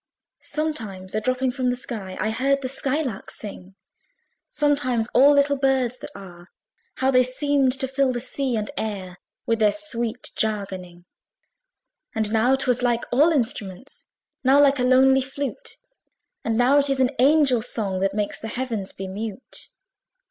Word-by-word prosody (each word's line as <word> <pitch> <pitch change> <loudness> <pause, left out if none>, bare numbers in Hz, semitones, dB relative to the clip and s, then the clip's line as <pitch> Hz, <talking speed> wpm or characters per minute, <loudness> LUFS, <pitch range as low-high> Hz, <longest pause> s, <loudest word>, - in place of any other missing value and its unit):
Sometimes 220 -12 -4
a 215 - 0
dropping 255 +2 0
from 255 -1 -1
the 245 - 0
sky 215 -7 -6
I 215 +3 0
heard 275 +4 +1
the - - -1
sky 275 +3 -1
lark 230 -9 -5
sing; 195 -2 -9 0.7
Sometimes 280 -6 +1
all 280 +3 +6
little 285 0 +3
birds 265 -2 +1
that - - -8
are, 175 -2 -12 0.5
How 265 +1 +1
they 255 -1 +5
seemed 270 +1 +1
to 265 0 -1
fill 270 0 +1
the 245 - -3
sea 260 0 -2
and 210 -1 -3
air 190 -4 -5 0.3
With 230 0 0
their 210 -1 +4
sweet 240 -5 -4
jargoning! 190 -5 -3 1.1
And 220 -1 -1
now 240 +4 +4
'twas 255 -2 0
like 240 -1 +1
all 290 +7 +5
instruments, 230 - -3 0.4
Now 270 +2 +5
like 280 -1 +4
a - - +2
lonely 265 +1 +5
flute; 280 - -5 0.7
And 225 -1 0
now 255 +4 +5
it 280 0 +1
is 270 -1 0
an 255 -1 +3
angel's 265 -4 +4
song, 195 -4 -2
That 195 +1 0
makes 210 -1 -2
the 225 - -6
Heavens 230 -4 -4
be 190 - -6
mute. 210 +4 -7
250 Hz, 165 wpm, -23 LUFS, 215-270 Hz, 1.1 s, all